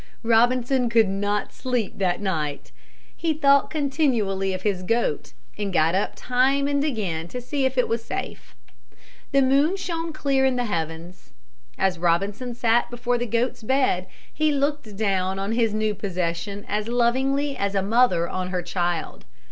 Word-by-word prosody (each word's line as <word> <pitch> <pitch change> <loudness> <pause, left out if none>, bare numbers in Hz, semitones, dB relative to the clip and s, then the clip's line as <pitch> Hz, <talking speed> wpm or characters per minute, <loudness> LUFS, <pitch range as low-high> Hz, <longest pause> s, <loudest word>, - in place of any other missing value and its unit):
Robinson 245 +2 +3
could 225 -2 +4
not 205 +1 -1
sleep 245 -7 -2
that 180 -2 +1
night. 155 -7 -3 0.4
He 325 -2 -1
thought 280 -2 +4
continually 255 -11 0
of 185 0 -4
his 200 -4 0
goat 205 -6 -1 0.3
and 205 -2 -2
got 165 -1 +3
up 195 +2 0
time 265 +3 +1
and 285 0 +1
again 195 - -2
to 250 - -6
see 270 +3 -2
if 260 0 -1
it 250 - +3
was 230 0 -1
safe. - - -6 0.8
The 275 0 +4
moon 280 +7 +3
shone 330 -3 -3
clear 275 -3 +1
in 265 -1 +3
the 245 -1 0
heavens. 165 -2 -5 0.4
As 190 -3 0
Robinson 200 +8 0
sat 235 0 +2
before 245 0 -1
the 240 - -2
goat's 235 +2 -1
bed 225 -7 +1 0.3
he 310 0 +2
looked 280 -7 -1
down 190 -3 0
on 195 +2 -2
his 225 -1 +2
new 215 0 0
possession 185 0 -3
as 210 +1 -2
lovingly 265 +4 +1
as 200 0 -2
a 195 - +1
mother 200 -5 +3
on 185 +1 -3
her 180 -1 -2
child. 175 -1 -2
225 Hz, 165 wpm, -24 LUFS, 190-260 Hz, 0.8 s, could